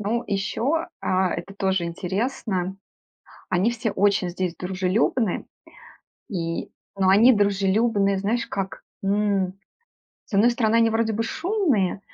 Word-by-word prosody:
Ну, 225 Hz, +4 st, -1 dB
еще, 260 Hz, +11 st, -1 dB
а, 185 Hz, -1 st, +1 dB
это 185 Hz, +3 st, -7 dB
тоже 190 Hz, -2 st, 0 dB
интересно, 190 Hz, +1 st, -2 dB, 0.7 s
они 185 Hz, +6 st, +2 dB
все 230 Hz, -2 st, -2 dB
очень 195 Hz, -2 st, +2 dB
здесь 180 Hz, -1 st, -3 dB
дружелюбные, 190 Hz, +4 st, 0 dB, 0.8 s
и, 165 Hz, -4 st, -3 dB, 0.3 s
но 190 Hz, -1 st, +3 dB
они 225 Hz, +7 st, +7 dB
дружелюбные, 200 Hz, 0 st, +2 dB
знаешь, 220 Hz, +5 st, 0 dB
как, 195 Hz, -1 st, -4 dB, 0.2 s
м, 200 Hz, -2 st, +1 dB, 0.7 s
с -, -, -8 dB
одной 215 Hz, +5 st, +5 dB
стороны, 230 Hz, -2 st, +1 dB
они 230 Hz, -1 st, +4 dB
вроде 225 Hz, 0 st, +1 dB
бы 220 Hz, -, -1 dB
шумные, 305 Hz, -, 0 dB
200 Hz, 125 wpm, -24 LUFS, 190-230 Hz, 0.8 s, они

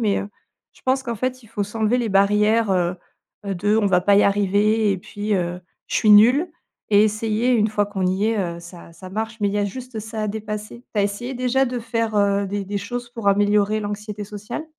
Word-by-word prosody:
Mais, 210 Hz, -4 st, +1 dB
heu, 200 Hz, -, -6 dB, 0.4 s
je -, -, -22 dB
pense 260 Hz, +1 st, +1 dB
qu'en 235 Hz, -3 st, -4 dB
fait, 255 Hz, +2 st, -3 dB
il 225 Hz, -, -18 dB
faut 210 Hz, -3 st, -2 dB
s'enlever 220 Hz, +3 st, 0 dB
les 235 Hz, -, -1 dB
barrières, 210 Hz, +2 st, +3 dB
heu, 180 Hz, -1 st, +1 dB, 0.5 s
heu, 195 Hz, -, -2 dB
de: 205 Hz, +4 st, +1 dB
«On 220 Hz, -, +2 dB
va 180 Hz, -2 st, +3 dB
pas 200 Hz, +2 st, +4 dB
y 205 Hz, -, +6 dB
arriver» 205 Hz, +2 st, +2 dB
et -, -, -2 dB
puis: 205 Hz, +3 st, -3 dB
«Heu, 175 Hz, -1 st, -2 dB, 0.3 s
je -, -, -1 dB
suis 215 Hz, -, +2 dB
nulle» 250 Hz, -, +6 dB, 0.4 s
et 205 Hz, +1 st, +6 dB
essayer. 215 Hz, +3 st, 0 dB
Une 220 Hz, -2 st, +3 dB
fois 205 Hz, -1 st, +1 dB
qu'on 190 Hz, -3 st, -2 dB
y 190 Hz, +3 st, +1 dB
est, 225 Hz, -, 0 dB
heu, 170 Hz, -3 st, -2 dB
ça 170 Hz, -1 st, -12 dB
ça 185 Hz, +1 st, -11 dB
marche. 220 Hz, +2 st, -4 dB
Mais 205 Hz, -, +2 dB
il -, -, -3 dB
y -, -, +1 dB
a 205 Hz, -, +1 dB
juste 250 Hz, +2 st, -7 dB
ça 220 Hz, 0 st, -5 dB
a -, -, -1 dB
dépasser. 215 Hz, +2 st, -6 dB
Tu 210 Hz, -, +2 dB
as -, -, +3 dB
essayé 240 Hz, +6 st, -4 dB
déjà 255 Hz, +2 st, +1 dB
de 245 Hz, 0 st, -3 dB
faire, 230 Hz, -1 st, -2 dB
heu, 200 Hz, 0 st, +2 dB
des 200 Hz, +1 st, -3 dB
des 200 Hz, +1 st, -3 dB
choses 240 Hz, +4 st, -6 dB
pour 230 Hz, -4 st, -2 dB
améliorer 205 Hz, +1 st, +2 dB
l'anxiété 210 Hz, 0 st, -5 dB
sociale? 210 Hz, +8 st, -7 dB
210 Hz, 235 wpm, -22 LUFS, 200-225 Hz, 0.5 s, y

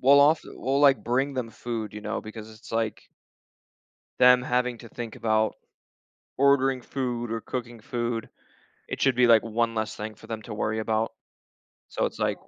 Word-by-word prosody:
we'll 140 Hz, +2 st, +7 dB
ofte 150 Hz, +3 st, +5 dB
we'll, 135 Hz, +2 st, 0 dB
like, 135 Hz, -7 st, +5 dB
bring 135 Hz, +3 st, +1 dB
them 125 Hz, -3 st, -3 dB
food, 110 Hz, -3 st, -5 dB
you 105 Hz, -, -6 dB
know, -, -, -2 dB
because 110 Hz, 0 st, -9 dB
it's, 110 Hz, +1 st, -14 dB
like 115 Hz, -1 st, -1 dB, 1.2 s
them 125 Hz, 0 st, +7 dB
having 125 Hz, -1 st, 0 dB
to 115 Hz, -, -11 dB
think 115 Hz, -1 st, -7 dB
about 110 Hz, -1 st, +1 dB, 0.8 s
ordering 135 Hz, -2 st, +3 dB
food 120 Hz, -3 st, -3 dB
or 115 Hz, -, -2 dB
cooking 120 Hz, -1 st, -5 dB
food, 120 Hz, -1 st, -3 dB, 0.6 s
it -, -, -5 dB
should 135 Hz, -2 st, +3 dB
be, 125 Hz, 0 st, +5 dB
like, 115 Hz, -2 st, +6 dB
one 115 Hz, 0 st, 0 dB
less 110 Hz, 0 st, -2 dB
thing 110 Hz, +1 st, -5 dB
for 110 Hz, -, -15 dB
them 110 Hz, -1 st, -5 dB
to 105 Hz, +1 st, -7 dB
worry 110 Hz, +1 st, -1 dB
about. 110 Hz, +1 st, 0 dB, 0.8 s
So, -, -, -1 dB
it's -, -, -5 dB
like, -, -, -1 dB
120 Hz, 180 wpm, -26 LUFS, 110-125 Hz, 1.2 s, we'll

